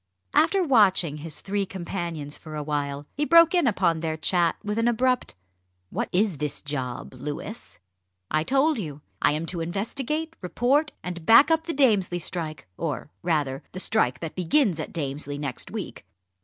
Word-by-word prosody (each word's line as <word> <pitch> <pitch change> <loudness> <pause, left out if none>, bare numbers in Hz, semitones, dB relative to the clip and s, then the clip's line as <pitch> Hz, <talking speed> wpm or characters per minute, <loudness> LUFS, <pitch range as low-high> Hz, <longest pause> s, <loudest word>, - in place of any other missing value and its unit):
After 390 -2 +4
watching 195 - +4
his 155 +1 -5
three 200 0 -1
companions 170 -5 -5
for 155 -2 -9
a 150 - -3
while, 145 -1 -2
he 295 - -1
broke 335 +2 +6
in 350 -7 +3
upon 170 -7 +2
their 160 -1 -2
chat 170 +1 +2
with 210 +1 -2
an 230 - +2
abrupt 250 - +1 0.6
"What - - -2
is 190 -3 +1
this 150 0 -1
job, 130 -5 -4
Louis?" 145 - -7 0.5
"I 155 0 +2
told 275 - +2
you. 150 -6 -6 0.2
I - - +4
am 155 +2 -2
to 170 0 -2
investigate, 270 - -3
report, 265 - +1
and 175 -2 -5
back 250 - +7
up 325 +1 +2
the - - 0
Damesley 210 -10 +3
strike, 165 -3 -4
or 150 -2 -3
rather 145 -6 0
the 185 - -5
strike 130 - +1
that 165 -2 -5
begins 185 - +2
at 155 - -4
Damesley 145 -2 -4
next 140 -4 -4
week." - - -6
175 Hz, 170 wpm, -26 LUFS, 150-235 Hz, 0.6 s, back